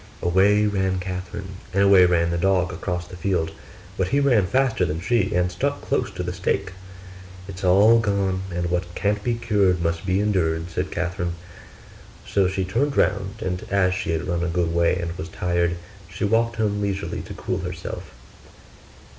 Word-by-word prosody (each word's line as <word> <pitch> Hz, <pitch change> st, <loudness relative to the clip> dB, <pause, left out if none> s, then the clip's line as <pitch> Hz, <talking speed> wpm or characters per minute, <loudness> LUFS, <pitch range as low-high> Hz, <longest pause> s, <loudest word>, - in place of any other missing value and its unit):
Away 100 Hz, +4 st, +4 dB
ran 95 Hz, -2 st, 0 dB
Catherine, 95 Hz, +1 st, -6 dB, 0.2 s
and 100 Hz, -, +4 dB
away 100 Hz, -2 st, +7 dB
ran 85 Hz, -1 st, +2 dB
the 85 Hz, -, 0 dB
dog 90 Hz, 0 st, +2 dB
across 90 Hz, 0 st, -3 dB
the 90 Hz, -, -11 dB
field: 85 Hz, -3 st, -1 dB, 0.5 s
but 95 Hz, -, +2 dB
he 140 Hz, +8 st, +2 dB
ran 120 Hz, -9 st, +3 dB
faster 130 Hz, -2 st, +1 dB
than 80 Hz, -2 st, -1 dB
she, 105 Hz, +2 st, +1 dB
and 90 Hz, 0 st, +1 dB
stuck -, -, -1 dB
close -, -, -1 dB
to 90 Hz, -, -4 dB
the 90 Hz, 0 st, -3 dB
steak. 95 Hz, +1 st, -1 dB, 0.8 s
'It's 95 Hz, -1 st, -8 dB
all 100 Hz, +5 st, +6 dB
gone, 100 Hz, -3 st, 0 dB
and 85 Hz, 0 st, -2 dB
"what 90 Hz, 0 st, -2 dB
can't 105 Hz, 0 st, 0 dB
be 120 Hz, +1 st, 0 dB
cured 105 Hz, -6 st, +2 dB
must 85 Hz, 0 st, -1 dB
be 95 Hz, 0 st, +1 dB
endured",' 85 Hz, -5 st, 0 dB
said -, -, -2 dB
Catherine. 90 Hz, -1 st, -2 dB, 0.9 s
So 100 Hz, -2 st, +2 dB
she 95 Hz, 0 st, -1 dB
turned 140 Hz, +10 st, 0 dB
round; 100 Hz, +2 st, 0 dB
and 90 Hz, -1 st, -3 dB
as 95 Hz, -2 st, +2 dB
she 95 Hz, -, -3 dB
had 80 Hz, +2 st, -1 dB
run 85 Hz, -1 st, -1 dB
a -, -, 0 dB
good 85 Hz, -1 st, 0 dB
way 85 Hz, 0 st, +3 dB
and 85 Hz, 0 st, -4 dB
was 80 Hz, -, -5 dB
tired, 85 Hz, 0 st, 0 dB, 0.3 s
she -, -, -5 dB
walked 115 Hz, +2 st, +2 dB
home 105 Hz, -2 st, 0 dB
leisurely 100 Hz, -1 st, -2 dB
to -, -, -9 dB
cool -, -, -3 dB
herself. -, -, -6 dB
95 Hz, 180 wpm, -23 LUFS, 90-100 Hz, 0.9 s, away